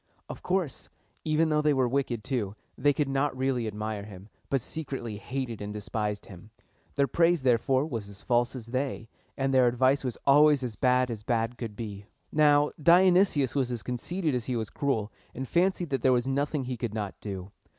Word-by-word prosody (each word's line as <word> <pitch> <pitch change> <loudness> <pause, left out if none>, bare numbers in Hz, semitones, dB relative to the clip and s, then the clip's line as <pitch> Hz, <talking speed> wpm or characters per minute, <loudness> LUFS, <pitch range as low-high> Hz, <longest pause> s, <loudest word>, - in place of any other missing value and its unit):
Of - - -8
course, 180 -6 -2 0.3
even 155 +1 +2
though 150 -1 +2
they 150 -1 +3
were 130 -2 +2
wicked 125 -3 -1
too, 110 -6 -2 0.2
they 145 - +3
could 145 0 0
not 135 0 0
really 130 -3 0
admire 105 0 -4
him, 100 0 -11 0.2
but 135 - +2
secretly 130 -6 -5
hated 120 +1 -4
and 105 0 -5
despised 105 0 -3
him. 95 +3 -13 0.5
Their 140 - +3
praise, 165 +3 +2
therefore, 130 +2 +2
was 115 -9 -5
as 100 0 -12
false 120 +1 +1
as 120 -4 -6
they, 130 -1 -3 0.3
and 135 0 0
their 130 -1 +5
advice 130 +3 +2
was 125 -3 -3
always 145 0 +6
as 120 -4 -4
bad 125 +2 +2
as 110 -3 -5
bad 115 +1 -1
could 115 -3 -6
be. 105 -2 -7 0.2
Now, 150 -1 +4
Dionysius 175 -4 +5
was 130 -3 0
as 120 -3 -4
conceited 155 +6 -2
as 125 -2 -1
he 125 - -2
was 110 -2 -3
cruel, 125 -8 -1 0.2
and 130 +1 -4
fancied 175 -1 +1
that 135 - 0
there 130 - +4
was 120 0 +1
nothing 140 +1 0
he 125 -1 -4
could 115 -2 -4
not 105 -3 -3
do. 95 -2 -6
130 Hz, 195 wpm, -28 LUFS, 110-145 Hz, 0.5 s, always